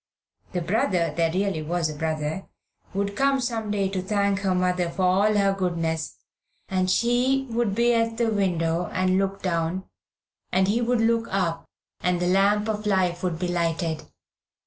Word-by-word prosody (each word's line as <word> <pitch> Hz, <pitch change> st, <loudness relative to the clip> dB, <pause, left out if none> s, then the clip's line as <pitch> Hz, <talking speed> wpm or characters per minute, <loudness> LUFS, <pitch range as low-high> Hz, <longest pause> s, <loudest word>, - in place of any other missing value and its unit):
The 180 Hz, -, -1 dB
brother 175 Hz, -3 st, +1 dB
there 165 Hz, -1 st, +2 dB
really 190 Hz, -2 st, 0 dB
was 165 Hz, +1 st, -1 dB
a 155 Hz, -, -4 dB
brother 155 Hz, +3 st, -3 dB, 0.4 s
would 200 Hz, +1 st, -2 dB
come 275 Hz, +2 st, +2 dB
some 230 Hz, -4 st, -2 dB
day 200 Hz, -2 st, +1 dB
to 190 Hz, -1 st, -2 dB
thank 200 Hz, 0 st, +1 dB
her 190 Hz, -2 st, 0 dB
mother 180 Hz, -1 st, +1 dB
for 185 Hz, +2 st, -3 dB
all 195 Hz, +4 st, +3 dB
her 200 Hz, -1 st, +3 dB
goodness, 165 Hz, -4 st, -2 dB, 0.5 s
and 185 Hz, -1 st, 0 dB
she 250 Hz, +5 st, +2 dB
would 225 Hz, -4 st, 0 dB
be 240 Hz, +1 st, +3 dB
at 230 Hz, -1 st, +1 dB
the 230 Hz, -2 st, +1 dB
window 175 Hz, -4 st, 0 dB
and 185 Hz, 0 st, +2 dB
look 195 Hz, 0 st, -2 dB
down, 170 Hz, 0 st, -1 dB, 0.7 s
and 190 Hz, 0 st, +3 dB
he 225 Hz, +4 st, +1 dB
would 240 Hz, 0 st, +1 dB
look 230 Hz, 0 st, +2 dB
up, 170 Hz, -4 st, -1 dB, 0.3 s
and 180 Hz, -1 st, 0 dB
the 175 Hz, -, 0 dB
lamp 200 Hz, +3 st, +3 dB
of 210 Hz, -1 st, -2 dB
life 180 Hz, -3 st, +1 dB
would 180 Hz, -3 st, -1 dB
be 180 Hz, +1 st, -2 dB
lighted. 165 Hz, -2 st, -1 dB
190 Hz, 170 wpm, -25 LUFS, 175-210 Hz, 0.7 s, all